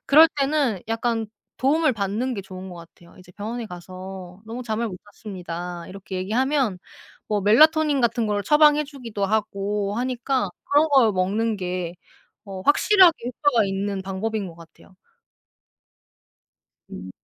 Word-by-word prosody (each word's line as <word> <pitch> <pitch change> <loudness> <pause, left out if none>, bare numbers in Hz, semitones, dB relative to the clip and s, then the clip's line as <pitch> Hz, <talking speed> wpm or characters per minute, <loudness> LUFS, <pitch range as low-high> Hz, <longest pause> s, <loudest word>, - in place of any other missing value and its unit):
그럴 315 +3 +8
때는 275 - +1
약간 225 0 -1 0.3
도움을 300 +1 +2
받는 215 +5 -2
게 200 - -5
좋은 185 0 -9
것 180 - -9
같아요. 170 0 -16
이제 180 0 -16
병원에 225 +5 -5
가서 185 0 -9
"너무 230 +3 -6
잠을 230 0 -2
못 185 -3 -8 0.2
잤습니다." 175 -3 -7
이렇게 190 0 -8
얘기하면 235 +2 0 0.5
뭐 210 -1 0
멜라토닌 300 - +4
같은 235 -1 +1
걸 205 -1 -1
처방해 300 +4 +5
주기도 240 -8 -5
하고 205 -1 -1
하니까 250 -2 -1 0.2
그런 295 +3 +4
걸 245 -6 +5
먹는 205 +4 0
게 180 -2 -4 0.5
어 195 -1 -7
확실하게 355 - +5
효과가 250 -3 +2
있는 195 0 -2
방법인 200 +2 -3
것 170 - -10
같아요. 170 +3 -17 2.0
음. 95 +1 -8
210 Hz, 290 characters per minute, -23 LUFS, 190-255 Hz, 2.0 s, 그럴